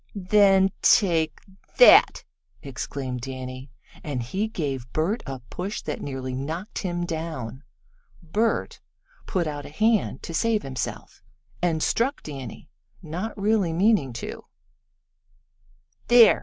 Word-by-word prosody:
"Then 195 0 +4
take 165 -6 +3 0.4
that!" - - +7 0.4
exclaimed 130 -1 -5
Danny, 130 +1 -7 0.3
and 135 -5 -3
he 195 - -2
gave 135 - -4
Bert 180 +9 0
a 135 -2 -5
push 195 +4 -4
that - - -4
nearly 130 -2 -4
knocked 160 +10 -4
him 175 -2 -2
down. 155 -8 -5 0.6
Bert 215 +8 -1 0.5
put 180 -3 0
out 145 -2 -5
a - - -10
hand 215 +7 +1
to 165 - -6
save 220 +5 +1
himself 130 -2 -5 0.4
and 165 -3 +1
struck 265 +5 0
Danny, 135 -4 -8 0.4
not 185 +8 -5
really 200 -4 +2
meaning 185 - +3
to. 115 - -7 1.6
"There! 240 -2 +7
165 Hz, 115 wpm, -25 LUFS, 135-205 Hz, 1.6 s, that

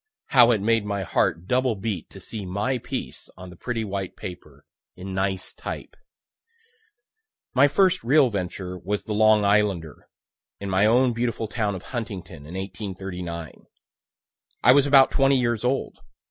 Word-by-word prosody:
How 120 -3 +7
it 110 -4 +2
made 115 +1 +2
my 100 -1 -2
heart 85 -1 0
double 125 +2 +1
beat 100 -4 -4
to - - -12
see 110 -2 -6
my 105 +8 -1
piece - - -6
on 90 0 -10
the - - -12
pretty 115 +4 -3
white 100 -3 -4
paper, 90 - -10 0.3
in 95 +1 -7
nice 95 -1 -2
type. - - -7 1.6
My 135 +2 +6
first 185 +5 +2
real 135 +1 +4
venture 90 -1 -4
was 100 +4 -3
the 105 - -3
"Long 110 0 +4
Islander," 100 -6 0 0.5
in 100 -1 -5
my 95 +3 +4
own 125 +2 +4
beautiful 115 -1 -2
town 105 -2 -2
of 95 - -8
Huntington, 90 - -7
in 85 - -9
1839. 90 -3 -6 1.0
I - - +8
was 140 +1 +5
about 135 -2 +6
twenty 135 0 +3
years 120 -3 0
old. 130 +2 -1
105 Hz, 155 wpm, -24 LUFS, 95-120 Hz, 1.6 s, I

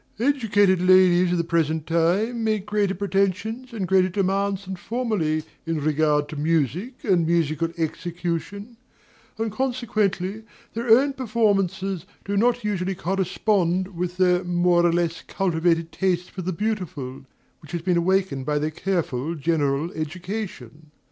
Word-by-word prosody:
Educated 210 -8 +3
ladies 185 -1 +5
of 180 - +1
the 170 - +1
present 160 -2 0
time 190 +9 +1
make 215 -3 0
greater 205 -2 0
pretensions 200 +5 -1
and 205 -5 -3
greater 185 0 +4
demands 195 +1 0
than 190 0 -5
formerly 190 -8 -1 0.2
in 165 -1 -1
regard 150 0 +1
to 155 - -6
music 165 - -1
and 185 -6 +3
musical 165 -1 +1
execution; 175 +6 -4 0.6
and 225 0 -2
consequently 215 -5 -1 0.3
their 235 +1 -3
own 270 +5 +5
performances 195 - 0 0.2
do 200 - -2
not 240 +3 +2
usually 195 -2 -1
correspond 190 0 0
with 180 -1 -4
their 180 -1 +3
more 175 0 +2
or - - +2
less 170 -1 0
cultivated 165 -3 0
taste 180 0 -1
for 185 - -6
the 185 +1 -2
beautiful, 175 -10 -4 0.4
which 155 - -13
has 170 -2 -3
been 180 -1 +2
awakened 185 -5 +1
by 150 +2 0
their 155 +1 -1
careful 165 -4 -2
general 150 0 0
education. 160 - -6
185 Hz, 140 wpm, -24 LUFS, 165-205 Hz, 0.6 s, ladies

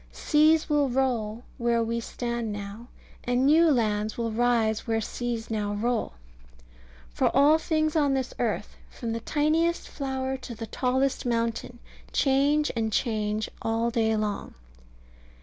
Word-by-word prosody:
Seas 310 +1 +3
will 295 -3 +2
roll 240 -3 -1 0.2
where 235 -1 +2
we 230 +1 -1
stand 235 -1 -3
now, 205 +3 -7 0.4
and 245 +2 +1
new 320 +3 +6
lands 215 -5 0
will 230 -1 -1
rise 225 -1 +1
where 225 -1 +1
seas 230 0 -4
now 205 -2 -1
roll. 230 - -1 1.0
For - - +2
all 290 +4 +6
things 310 -1 0
on 285 -3 +3
this 260 -1 -2
earth, - - -2
from 235 -3 -5
the 230 - -2
tiniest 310 +7 +1
flower 265 -1 -3
to 255 -2 -8
the 225 +1 -6
tallest 260 +4 0
mountain, 230 0 -2 0.3
change 285 +2 +2
and 220 -1 -1
change 215 -2 -1
all 225 +1 0
day 220 -1 +1
long. 210 -1 -3
240 Hz, 140 wpm, -27 LUFS, 225-275 Hz, 1.0 s, new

